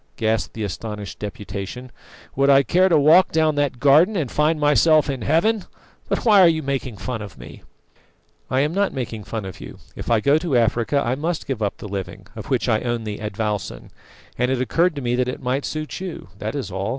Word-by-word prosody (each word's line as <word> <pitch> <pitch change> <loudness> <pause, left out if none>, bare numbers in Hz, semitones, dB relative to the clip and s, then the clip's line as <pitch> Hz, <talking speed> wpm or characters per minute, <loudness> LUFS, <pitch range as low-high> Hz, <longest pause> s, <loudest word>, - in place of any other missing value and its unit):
gasped 110 -1 -1
the 110 - -4
astonished 105 0 -6
Deputation. 105 +3 -6 0.4
"Would 140 +1 +3
I 140 0 +6
care 185 +6 +3
to 165 - +4
walk 155 +6 +5
down 155 -1 +2
that 145 -4 -1
garden 150 - +5
and 150 -9 -2
find 155 +1 +1
myself 150 0 +4
in 130 -3 -5
Heaven? 180 - +1 0.4
But - - -1
why 210 -4 +7
are 180 - +8
you 160 -2 +1
making 135 -5 -3
fun 110 +3 -4
of 105 -3 -9
me?" - - -12 0.9
"I 130 +1 +2
am 150 +3 0
not 200 +1 0
making 115 -5 -5
fun 110 -4 -5
of 95 - -9
you. - - -10 0.2
If - - -7
I 115 -2 +4
go 140 +7 +3
to 160 -6 0
Africa 120 +4 +1
I 120 - 0
must 160 +5 -3
give 130 -5 -4
up 100 -2 -1
the - - -8
living, 100 -2 -6
of - - -8
which - - 0
I 110 - +2
own 120 -2 -2
the 105 -1 -5
advowson, 105 -1 -4 0.5
and 125 0 +2
it 130 -1 0
occurred 165 +6 +1
to 140 - -5
me 120 0 0
that 125 0 +1
it 125 - -4
might 130 +2 -2
suit 155 0 -5
you 180 - -7
that 110 +6 -4
is 135 -8 -4
all. 95 +3 -3
130 Hz, 220 wpm, -22 LUFS, 110-155 Hz, 0.9 s, are